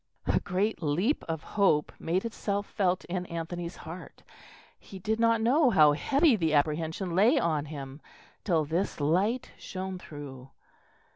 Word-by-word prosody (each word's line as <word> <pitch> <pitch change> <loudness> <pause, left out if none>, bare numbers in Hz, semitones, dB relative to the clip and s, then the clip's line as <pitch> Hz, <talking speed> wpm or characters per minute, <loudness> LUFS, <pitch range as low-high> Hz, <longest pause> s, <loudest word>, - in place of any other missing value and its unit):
A - - +2
great 195 +4 -1
leap 175 - 0
of 160 -2 -3
hope 185 -8 +2
made 180 +6 -1
itself 205 -2 -2
felt 185 -3 0
in 180 0 -4
Anthony's 170 +1 -5
heart; 170 +3 -10 0.6
he 195 - -11
did 215 +4 -2
not 230 -1 +3
know 265 +4 +4
how 155 -9 +6
heavy 275 - +3
the 160 -6 +1
apprehension 160 +4 0
lay 225 - +5
on 155 - 0
him 140 -1 -8 0.4
till 165 -6 +1
this 165 +5 -2
light 190 - +1
shone 190 0 -5
through. 135 -5 -10
180 Hz, 145 wpm, -29 LUFS, 155-210 Hz, 0.6 s, how